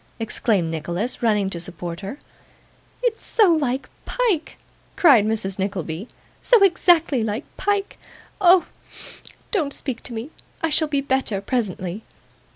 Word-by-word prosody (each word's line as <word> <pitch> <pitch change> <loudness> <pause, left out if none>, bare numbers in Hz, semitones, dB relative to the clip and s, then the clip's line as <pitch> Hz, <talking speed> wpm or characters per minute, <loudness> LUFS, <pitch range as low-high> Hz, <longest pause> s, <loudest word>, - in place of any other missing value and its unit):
exclaimed 215 -6 0
Nicholas, 175 +9 -3
running 210 -4 +2
to 180 -3 -4
support 175 -1 -6
her. 200 +7 -6 0.9
'It's 470 -2 0
so 410 -7 +4
like 275 -4 -1 0.2
Pyke,' 435 -11 0 0.4
cried 275 - +6
Mrs. 200 -3 -2
Nickleby; 190 -1 -3 0.3
'so 475 -5 +5
exactly 345 -7 +4
like 220 +5 -3
Pyke. 405 -1 -1 0.4
Oh! 360 -1 +6 0.9
don't 310 -10 0
speak 260 -4 -5
to 245 - -7
me 230 +7 -6 0.3
I 325 - +2
shall 315 +1 +2
be 285 -2 0
better 265 -7 0
presently. 200 -4 -3
245 Hz, 130 wpm, -22 LUFS, 195-325 Hz, 0.9 s, cried